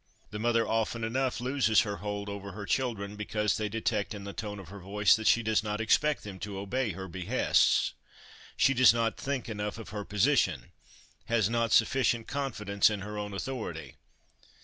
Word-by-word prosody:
The 105 - -5
mother 115 0 +2
often 115 +1 -1
enough 130 +3 -1
loses 125 -4 +3
her 100 -2 -3
hold 105 +2 -4
over 100 -1 -6
her 105 +1 -6
children 105 -5 -1
because 105 0 -1
they 105 -1 -2
detect 110 -1 -1
in 100 - -8
the 100 0 -7
tone 105 -2 -5
of 95 -4 -10
her 100 +1 -9
voice 100 +2 +3
that 110 -1 -2
she 120 - +4
does 110 -1 +2
not 105 -1 -3
expect 150 +7 +2
them 100 -3 -8
to 100 0 -5
obey 105 +3 -2
her 95 +2 -7
behests; 95 +8 +2 0.6
she 135 - +4
does 130 -2 +6
not 115 -1 0
think 140 -2 -3
enough 105 -1 -4
of 115 - -9
her 105 -1 -5
position; 95 -11 +1 0.5
has 115 -2 +1
not 115 -2 +1
sufficient 120 -3 +3
confidence 110 -8 +1
in 105 -2 -3
her 105 +1 -6
own 105 0 -4
authority. 95 - -5
105 Hz, 185 wpm, -29 LUFS, 100-115 Hz, 0.6 s, does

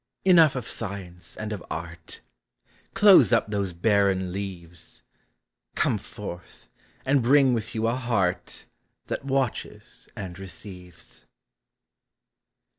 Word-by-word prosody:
Enough 165 -6 +6
of 125 -3 -4
science 95 -5 -7
and 110 0 -4
of 100 - -7
art; 85 -1 -7 0.7
Close 200 -9 +7
up 115 -2 +2
those 100 -3 -1
barren 95 0 +1
leaves; 90 -4 -8 0.7
Come - - +1
forth, 85 -1 -10 0.4
and 135 0 +3
bring 135 +1 +5
with 110 -1 -3
you 110 0 0
a 115 - +2
heart 100 -8 -1 0.4
That - - -3
watches 135 -3 -3
and 95 -2 -7
receives. 90 -2 -11
100 Hz, 110 wpm, -25 LUFS, 90-120 Hz, 0.7 s, Close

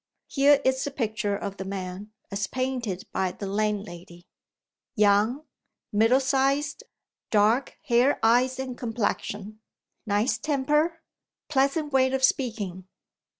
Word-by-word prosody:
Here 280 0 +4
is 260 0 +2
the - - -2
picture 220 -6 -2
of 200 -1 -6
the - - -4
man, 190 +1 -6 0.2
as 200 0 -2
painted 250 -7 -3
by 185 -1 -1
the 200 - -7
landlady: 195 -4 -3 0.7
Young; 210 +7 +3 0.5
middle 225 +5 +4
sized; 275 - 0 0.5
dark 220 +5 +2
hair, 255 0 +3
eyes, 245 +3 +3
and 260 -1 -4
complexion; 215 -3 -3 0.5
nice 215 +2 +1
temper, 300 +4 0 0.5
pleasant 280 +1 +1
way 260 -1 +4
of 265 0 -1
speaking. 210 -9 0
235 Hz, 115 wpm, -26 LUFS, 205-265 Hz, 0.7 s, Here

